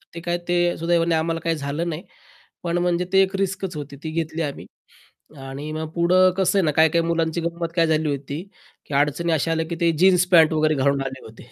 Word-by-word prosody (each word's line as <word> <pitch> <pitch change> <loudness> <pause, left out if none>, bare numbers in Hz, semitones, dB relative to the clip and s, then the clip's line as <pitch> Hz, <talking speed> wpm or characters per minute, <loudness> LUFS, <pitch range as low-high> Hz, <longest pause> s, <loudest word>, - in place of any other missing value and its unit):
ते - - -5
काय 175 +1 -1
ते 175 - +1 0.2
सुदैवाने 170 0 +1
आम्हाला 165 +1 -1
काही 165 -1 0
झालं 150 +4 -3
नाही, 160 +2 -5 0.6
पण 170 0 -1
म्हणजे 175 0 0
ते 190 - +6
एक 190 +1 -3
रिस्कच 195 -2 -2
होती, 145 -1 -7
ती 160 - -4
घेतली 160 0 -3
आम्ही. 145 -3 -4 0.7
आणि 135 +3 -7
मग 155 0 -4
पुढं 185 +2 +4
कसं 195 +1 +2
आहे - - +2
ना, 150 - +2
काही-काही 160 +2 +3
मुलांची 165 0 -1
गंमत 170 0 -3
काय 165 -2 +3
झाली 155 -1 +1
होती, 140 +2 -4 0.4
की 145 - -9
अडचणी 150 +4 +1
अशा 160 +1 0
आल्या, 160 0 0
की 170 - -4
ते 170 -1 +4
जीन्स 180 -1 +5
पॅन्ट 160 -2 +6
वगैरे 155 0 +2
घालून 140 0 +1
आले 130 0 -6
होते. 115 +2 -14
165 Hz, 215 wpm, -22 LUFS, 150-170 Hz, 0.7 s, ते